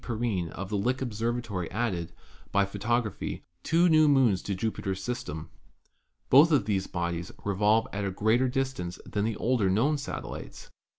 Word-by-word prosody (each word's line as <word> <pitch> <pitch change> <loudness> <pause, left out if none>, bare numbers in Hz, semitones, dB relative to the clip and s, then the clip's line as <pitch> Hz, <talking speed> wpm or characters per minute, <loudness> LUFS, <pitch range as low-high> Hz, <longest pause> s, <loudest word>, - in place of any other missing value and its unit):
Perrine 110 -7 -1
of 95 +2 -6
Lick 115 +6 0
Observatory 115 -5 -2
added, 95 -6 -2 0.4
by 100 0 +3
photography, 110 +2 -2 0.2
two 170 - +3
new 155 -2 +5
moons 130 -10 +4
to 100 - -3
Jupiter's 95 -2 -2
system. 85 -11 -5 0.8
Both 150 +6 +8
of 145 - +3
these 95 -3 0
bodies 85 -1 -3
revolve 105 +3 +3
at 100 +1 -2
a 100 - 0
greater 110 +7 +2
distance 130 -9 -2
than 105 0 -1
the 110 -1 -1
older 115 -5 +1
known 135 +10 +2
satellites. 140 - -7
110 Hz, 145 wpm, -28 LUFS, 95-125 Hz, 0.8 s, Both